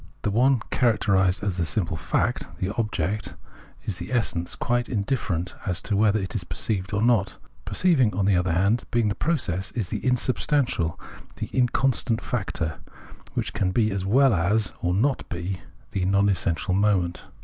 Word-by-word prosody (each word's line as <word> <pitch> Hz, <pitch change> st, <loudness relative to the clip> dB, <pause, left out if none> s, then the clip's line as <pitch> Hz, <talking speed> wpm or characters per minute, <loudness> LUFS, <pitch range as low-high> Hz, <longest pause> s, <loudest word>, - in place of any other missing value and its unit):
The 105 Hz, -, 0 dB
one 125 Hz, +3 st, +3 dB
characterised 100 Hz, -7 st, +2 dB
as 100 Hz, -3 st, -1 dB
the 90 Hz, -, +1 dB
simple 85 Hz, -2 st, -1 dB
fact, -, -, -1 dB
the 95 Hz, +2 st, -2 dB
object, 105 Hz, -2 st, -2 dB, 0.5 s
is 95 Hz, -, -3 dB
the -, -, -7 dB
essence, 100 Hz, -8 st, -1 dB
quite 120 Hz, 0 st, 0 dB
in 105 Hz, -5 st, 0 dB
different 95 Hz, -8 st, -2 dB
as 90 Hz, -2 st, +1 dB
to 105 Hz, -, 0 dB
whether 105 Hz, +1 st, +3 dB
it 95 Hz, -2 st, -4 dB
is 100 Hz, -, -2 dB
perceived 95 Hz, +1 st, -3 dB
or 105 Hz, +1 st, 0 dB
not: 115 Hz, -5 st, +2 dB, 0.3 s
per -, -, -5 dB
ceiving, 145 Hz, -12 st, +4 dB
on 95 Hz, 0 st, +1 dB
the 100 Hz, -1 st, +4 dB
other 90 Hz, 0 st, +1 dB
hand, 100 Hz, +7 st, +2 dB
being 115 Hz, -3 st, +2 dB
the -, -, 0 dB
process, 100 Hz, -, -1 dB
is 105 Hz, -7 st, -2 dB
the -, -, -4 dB
insubstantial, 125 Hz, -, 0 dB, 0.4 s
the -, -, -6 dB
inconstant 125 Hz, -2 st, +2 dB
factor, 95 Hz, -10 st, -3 dB, 0.6 s
which -, -, -2 dB
can 95 Hz, -, 0 dB
be 110 Hz, +1 st, +2 dB
as 95 Hz, -1 st, -2 dB
■well 125 Hz, +5 st, +4 dB
as 100 Hz, +5 st, +2 dB
not 105 Hz, +10 st, 0 dB
be, 85 Hz, +1 st, -4 dB
is -, -, -19 dB, 0.3 s
the 95 Hz, -2 st, -1 dB
non 100 Hz, +1 st, +3 dB
essential 90 Hz, 0 st, 0 dB
moment. 95 Hz, -3 st, +1 dB
100 Hz, 175 wpm, -25 LUFS, 90-120 Hz, 0.6 s, ceiving